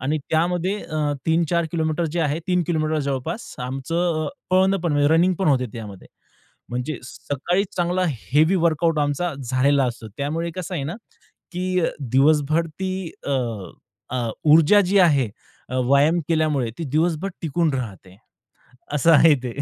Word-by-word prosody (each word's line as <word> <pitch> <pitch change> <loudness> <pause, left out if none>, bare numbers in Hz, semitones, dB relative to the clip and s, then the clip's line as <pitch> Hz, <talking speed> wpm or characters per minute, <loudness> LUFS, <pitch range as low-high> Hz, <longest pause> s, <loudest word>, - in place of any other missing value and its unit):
आणि 145 +5 -1
त्यामध्ये 175 +4 +1
अ, 150 -2 -2
3-4 170 +1 +2
किलोमीटर 160 0 0
जे 175 - +1
आहे, 150 -1 0
3 180 -1 +2
किलोमीटर 155 -2 0
जवळपास 140 - -4
आमचं 155 +5 -1 0.2
पळणं 190 +1 +4
पण 165 -3 -1
म्हणजे 145 0 +3
रनिंग 180 +2 +3
पण 190 - +1
होते. 130 -3 +2
त्यामध्ये 105 -5 -9 0.6
म्हणजे 125 +4 -3
सकाळी 160 +9 -2
चांगला 180 +1 0
हेवी 150 - +1
वर्कआउट 165 -2 +1
आमचा 145 +4 -1
झालेला 135 +3 +2
असतो. 120 -2 -5
त्यामुळे 160 +4 -2
कसं 185 0 -5
आहे 145 - -2
ना, 160 +7 -4 0.6
की 185 0 -1
अ, 165 - +1 0.3
दिवसभर 155 +3 +3
ती 185 +5 -5 0.4
अ, - - 0 0.9
अ, 120 -2 -1 0.2
ऊर्जा 165 +6 +6
जी 200 +2 +3
आहे 145 - +4 0.4
अ, 130 - -2
व्यायाम 145 +6 +4
केल्यामुळे 155 -7 +1
ती 170 - -4
दिवसभर 170 +3 +1
टिकून 165 -1 0
राहते. 100 -7 -6 0.8
असं 150 +3 +4
आहे 160 0 +7
ते. 125 -2 -4
155 Hz, 150 wpm, -22 LUFS, 140-175 Hz, 0.9 s, आहे